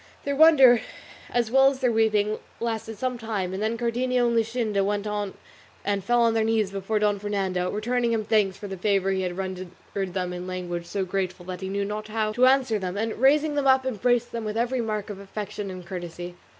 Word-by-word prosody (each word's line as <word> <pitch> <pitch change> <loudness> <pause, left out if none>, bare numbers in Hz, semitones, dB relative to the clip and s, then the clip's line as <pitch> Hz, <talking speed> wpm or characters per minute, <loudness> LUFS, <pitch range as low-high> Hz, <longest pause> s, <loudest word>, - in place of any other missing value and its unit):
Their 280 0 -1
wonder 270 -6 +7 0.5
as 235 -2 0
well 270 +1 +6
as 270 -1 -5
their 250 -3 +2
weeping 215 -1 +2 0.2
lasted 225 -1 -3
some 250 +1 -2
time, 205 -5 -3
and 190 - -4
then 220 +2 0
Cardenio 245 +1 +1
and 235 - +1
Luscinda 225 -3 0
went 205 +1 -1 0.8
and 200 -1 0
fell 240 +4 +3
on 230 -1 +3
their 225 -1 +2
knees 220 -3 +1
before 195 +2 -2
Don 210 -1 +1
Fernando, 190 -3 -1
returning 235 +3 0
him 220 -2 0
thanks 205 -3 +2
for 205 - -7
the 195 -1 -6
favour 195 0 +1
he 190 -1 0
had 180 -1 -3
rendered 185 -1 -4 0.3
them 185 -2 -2
in 180 +1 -6
language 175 -2 -4
so 195 0 -2
grateful 185 -1 -3
that 185 0 -6
he 190 - -4
knew 200 +1 -1
not 210 +1 -4
how 215 0 -1
to 245 +4 +4
answer 260 -5 +3
them, 185 0 -4
and 220 +1 -2
raising 295 +3 +4
them 285 -1 0
up 265 0 +4
embraced 245 0 +1
them 230 -1 -4
with 215 0 -3
every 245 +2 0
mark 215 -2 -3
of 200 - -8
affection 200 0 -6
and 185 -1 -8
courtesy. 175 -1 -6
215 Hz, 215 wpm, -25 LUFS, 195-235 Hz, 0.8 s, wonder